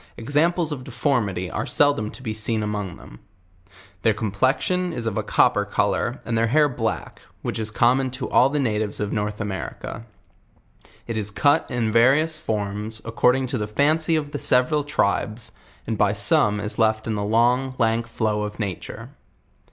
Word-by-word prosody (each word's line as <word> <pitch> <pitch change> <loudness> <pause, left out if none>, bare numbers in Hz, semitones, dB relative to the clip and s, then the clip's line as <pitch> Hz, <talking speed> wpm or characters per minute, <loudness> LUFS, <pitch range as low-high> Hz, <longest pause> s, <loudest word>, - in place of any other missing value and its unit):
Examples 155 +7 +1
of 135 -4 -5
deformity 120 -8 -1
?re - - -2
seldom 145 -7 +2
to 130 - -11
be 110 -3 -3
seen 110 0 -1
among 105 -4 -4
them. - - -14 0.8
Their 110 -2 +2
complexion 130 - 0
is 120 -6 -1
of 110 -3 -2
a 110 - 0
copper 105 0 +2
color 105 +5 -1
and 115 - -2
their 115 0 +2
hair 150 +5 +4
black, 120 -5 -4 0.2
which - - -3
is 110 -1 -3
common 125 +4 +2
to 130 - -4
all 130 - +4
the 150 - -2
natives 110 -6 -1
of 105 -1 -2
North 105 -1 -2
America. 105 +2 -5 1.0
It 115 -1 -4
is 105 -2 +1
cut 145 +7 +2
in 115 -3 -1
various 140 +8 +3
forms 105 +1 -3
accor 115 +2 +2
ding 130 0 -1
to 125 -1 -3
the 105 - -2
fancy 155 +8 +2
of 145 -2 -2
the 145 - -4
several 130 +5 +2
tribes, 115 -5 -1 0.3
and 110 -2 -3
by 105 -1 +3
some 105 0 +3
is 105 +2 -2
loft 110 -1 +2
in 110 - -2
the 100 -1 -2
long, 120 +5 +2
jank 115 -2 0
flow 110 -2 -1
of 105 0 -5
nature. 100 -5 -5
115 Hz, 175 wpm, -23 LUFS, 105-135 Hz, 1.0 s, hair